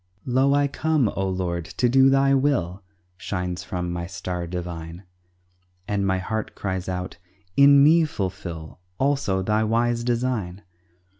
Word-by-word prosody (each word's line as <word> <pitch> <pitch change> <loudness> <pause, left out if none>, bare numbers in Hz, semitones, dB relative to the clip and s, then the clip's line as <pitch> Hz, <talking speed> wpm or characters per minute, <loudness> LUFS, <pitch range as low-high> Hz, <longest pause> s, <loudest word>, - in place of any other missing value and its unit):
"Lo, 135 +2 +3
I 145 0 +3
come, 150 -4 +1
O 95 -1 -2
Lord, 90 -2 -2
to 100 +8 -1
do 135 +2 +5
Thy 135 0 +3
will!" 125 - 0 0.4
Shines 90 -2 -4
from 90 -1 -4
my 85 0 -4
star 90 -1 -5
divine, 85 0 -6 0.8
And 100 -1 0
my 95 0 +1
heart 110 +4 -4
cries 95 -2 -3
out, 90 0 -5 0.4
"In 140 0 +7
me 160 +2 +5
fulfill 90 - -5 0.2
Also, 135 -9 0
Thy 105 +3 +1
wise 120 +2 +1
design." 115 -6 -2
100 Hz, 140 wpm, -24 LUFS, 90-130 Hz, 0.8 s, In